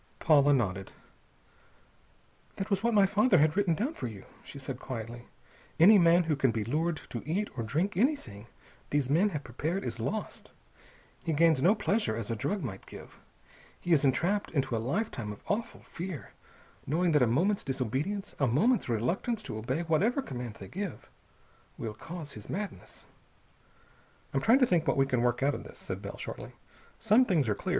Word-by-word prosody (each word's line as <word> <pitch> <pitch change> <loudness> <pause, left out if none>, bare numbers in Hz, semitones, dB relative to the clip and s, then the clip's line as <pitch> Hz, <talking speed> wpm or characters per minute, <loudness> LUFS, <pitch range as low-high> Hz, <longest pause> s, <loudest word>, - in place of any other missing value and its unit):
Paula 145 -3 +5
nodded. 95 -8 0 1.6
"That 195 +2 -5
was 195 - +2
what 235 0 +1
my 200 -1 +6
father 205 +1 +4
had 155 0 +3
written 195 -5 +2
down 250 - -1
for 125 - -5
you," 105 -4 -9 0.2
she - - -11
said 135 -2 -6
quietly. 120 -1 -7 0.5
"Any 200 +5 +8
man 170 0 +5
who 160 -2 0
can 135 -2 +2
be 115 -2 -1
lured 155 +7 -1
to 120 - -4
eat 190 +7 -2
or 120 - -3
drink 165 - -1
anything 175 - -1 0.4
these 145 -2 0
men 180 +8 +4
have 150 -6 -4
prepared 155 +11 -3
is 120 -1 -4
lost. 200 - -4 0.7
He 165 -2 -1
gains 160 -2 +4
no 190 +8 +5
pleasure, 205 - 0
as 115 -1 -4
a - - 0
drug 195 - -2
might 95 -7 -6
give. - - -12 0.6
He 175 - -4
is 150 - +4
entrapped 175 +9 +1
into 135 -5 -1
a 110 - -1
lifetime 125 - -2
of 105 - -11
awful 225 +3 -2
fear, 175 -4 -7 0.6
knowing 170 +4 +2
that 150 -3 +4
a 125 - +5
moment's 180 - +1
disobedience, 140 - -2
a 135 - +3
moment's 190 - +2
reluctance 175 - -1
to 110 - -5
obey 130 +8 -2
whatever 200 - +1
command 125 - -6
they 95 - -10
give, 195 - -6 0.7
will 110 -2 -4
cause 160 +5 -8
his 105 -5 -11
madness." 205 +2 -6 1.3
"I'm - - +1
trying 230 +4 +5
to 265 - +5
think 170 -7 +1
what - - +2
we 135 - +4
can 125 -3 0
work 120 +1 +1
out 145 +1 +3
of - - -5
this," - - -12
said - - -6
Bell - - -7
shortly. - - -7 0.4
"Some 220 +3 +5
things 165 - +1
are 105 - +2
clear. - - -6
155 Hz, 185 wpm, -30 LUFS, 120-195 Hz, 1.6 s, Any